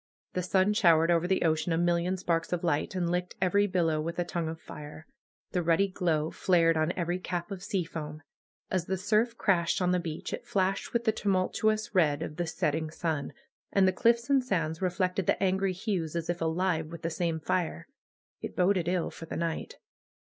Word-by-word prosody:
The 180 - 0
sun 190 +3 +2
showered 170 -4 +4
over 170 0 +2
the 190 0 +1
ocean 160 +1 +1
a 165 - +2
million 175 +2 +1
sparks 170 -2 -1
of 180 -1 -1
light, 155 +1 0
and 180 -2 0
licked 180 +1 -2
every 200 +2 +3
bil 180 -3 +1
low 155 -1 +1
with 170 +2 -4
a 175 - +1
tongue 170 -2 -3
of 160 0 -6
fire. 150 0 -10 0.5
The 180 - 0
ruddy 170 +4 +3
glow 165 -4 0
flared 165 -3 +3
on 155 +1 +1
every 175 0 -2
cap 175 0 -4
of 190 -2 -5
seafoam. 160 -6 -4 0.5
As 185 -2 0
the 190 +1 -1
surf 220 +5 +1
crashed 170 -4 +2
on 180 -1 +2
the 180 - +2
beach 160 -3 -5
it - - -6
flashed 190 0 0
with 235 -1 0
the 220 - +3
tumultuous 215 +2 0
red 155 -5 +3
of 150 - -6
the 175 -1 -1
set 160 -2 0
ting 160 +1 -2
sun. 160 -2 -2 0.4
And 195 -1 +4
the 185 - +3
cliffs 235 +4 +2
and 275 -2 +3
sands 165 -8 -1
reflected 185 0 0
the - - +3
angry 190 0 +2
hues, 185 -4 -2
as 170 0 -1
if 175 - -6
alive 165 0 0
with 170 +1 -9
the 165 - -1
same 165 -1 -1
fire. 170 +1 -2 0.5
It - - -6
boded 180 -2 +2
ill 180 -1 0
for 165 - -10
the - - -5
night. 165 -1 -3
175 Hz, 210 wpm, -29 LUFS, 165-190 Hz, 0.5 s, showered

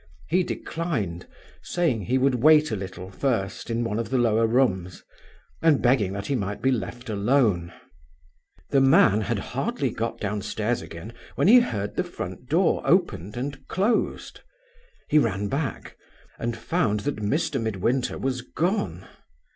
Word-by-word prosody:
He 185 - +3
declined, 135 - -3 0.3
saying 165 -11 0
he 130 +3 +1
would 130 -2 +2
wait 155 -1 +6
a - - 0
little 95 -1 -7
first 105 -3 -2
in 115 +1 0
one 115 -1 -2
of 115 -3 -3
the 130 - +1
lower 115 -2 +3
rooms, 95 -8 0 0.6
and 160 -4 +4
begging 120 -6 +2
that 100 0 -5
he 140 - -1
might 100 -5 -2
be 135 - +2
left 120 +1 -4
alone. 105 -5 +1 1.0
The 135 - +4
man 135 - +5
had 105 - -1
hardly - - -2
got - - -3
downstairs 105 +3 -2
again 90 +8 -9 0.2
when - - +2
he 245 +4 +9
heard 105 - -3
the - - +2
front - - -7
door - - +2
opened 100 +7 +1
and 135 +2 -5
closed. 215 +4 -1 0.7
He 150 - +4
ran 100 -5 0
back, 135 -3 -3 0.4
and 115 0 -2
found 115 - 0
that 145 +3 -2
Mr. 135 +6 -1
Midwinter 115 +4 -1
was 130 -2 -2
gone. 125 - -2
115 Hz, 150 wpm, -25 LUFS, 100-135 Hz, 1.0 s, he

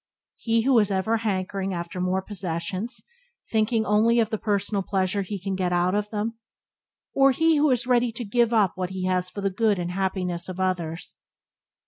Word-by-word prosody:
He 225 -1 +1
who 260 -2 +5
is 210 -2 +2
ever 200 +4 +1
hankering 195 -3 -2
after 170 +1 -5
more 185 +1 0
possessions, 185 +4 -4 0.5
thinking 220 0 +1
only 220 +3 +3
of 225 0 +1
the 220 - -1
personal 205 -1 0
pleasure 190 +1 0
he 200 +1 -5
can 195 +1 -3
get 185 -1 -1
out 175 +1 +2
of 210 0 -1
them? 225 +2 -3 0.7
or 275 0 +5
he 320 +4 +3
who 295 +1 +4
is 250 -2 +2
ever 255 - -2
ready 240 -1 +3
to 235 +1 -5
give 235 +2 +2
up 210 -6 +3
what 185 -1 -3
he 190 -1 -4
has 185 0 0
for 200 - -6
the 195 0 0
good 210 +1 +2
and 175 0 -3
happiness 180 -2 -2
of 185 0 -6
others? 175 -3 -2
200 Hz, 195 wpm, -25 LUFS, 185-225 Hz, 0.7 s, who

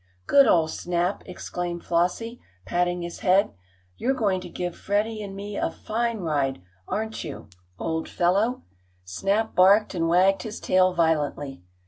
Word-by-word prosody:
"Good 280 -2 +6
old 160 -5 +3
Snap!" 175 +2 -1
exclaimed 175 -1 -5
Flossie, 180 +8 -1 0.2
patting 175 - 0
his 170 0 -6
head. 195 +2 +3 0.4
"You're 265 +3 0
going 195 -6 +1
to - - -8
give 175 -1 -4
Freddie 215 +2 -1
and 195 -2 -7
me 200 +1 -6
a - - 0
fine 230 +4 -2
ride; 145 - 0 0.3
aren't 220 +1 -3
you, 140 -7 -8 0.3
old 160 0 -3
fellow?" 200 +8 +1 0.4
Snap 195 - -1
barked 200 +4 +5
and 165 -2 0
wagged 185 +3 +4
his 220 -1 -6
tail 185 0 +3
violently. 145 - 0
185 Hz, 145 wpm, -25 LUFS, 170-210 Hz, 0.4 s, Good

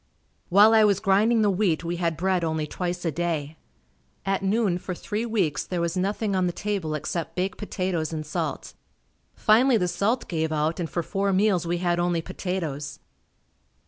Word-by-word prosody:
While 205 +4 +7
I 220 -1 +6
was 200 -2 +3
grinding 215 +4 +3
the 205 - +3
wheat 185 -4 +1
we 170 +1 -3
had 170 -2 -1
bread 185 0 +1
only 160 -1 -1
twice 175 +3 -4
a 165 - +1
day. 160 -2 -2 0.7
At 195 0 0
noon, 195 -2 +1
for 180 0 -5
three 215 +6 -3
weeks, 190 -10 0
there 180 - -3
was 170 +1 -1
nothing 200 +2 -1
on 185 -1 +2
the - - 0
table 195 -7 -2
except 155 +3 -4
baked 185 +1 -2
potatoes 185 -6 -2
and 155 -1 -4
salt. 150 - -4 0.6
Finally 235 +3 +4
the 180 -4 0
salt 220 +8 0
gave 160 -2 -1
out 155 +2 0
and 165 -2 -2
for 170 - -2
four 195 +3 -1
meals 190 -3 +2
we 175 +1 0
had 175 -1 0
only 175 -1 +1
potatoes. 170 -6 -4
180 Hz, 180 wpm, -25 LUFS, 165-200 Hz, 0.7 s, While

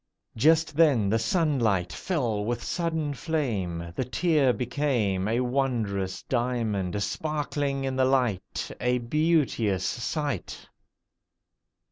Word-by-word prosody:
Just 155 +4 +3
then 140 -11 +4
the 115 +2 +2
sunlight 110 - +1
fell 115 - -1
with 120 +2 -2
sudden 160 -4 -1
flame: 100 - -2
The - - 0
tear 150 0 +2
became 120 -7 0
A 115 +3 +1
wondrous 115 -8 -1
diamond 110 -6 -1
sparkling 145 -2 -2
in 135 -1 -2
the 130 0 +3
light— 125 -8 0
A 125 0 +2
beauteous 125 - +1
sight. 140 - -3
125 Hz, 105 wpm, -27 LUFS, 105-150 Hz, -, then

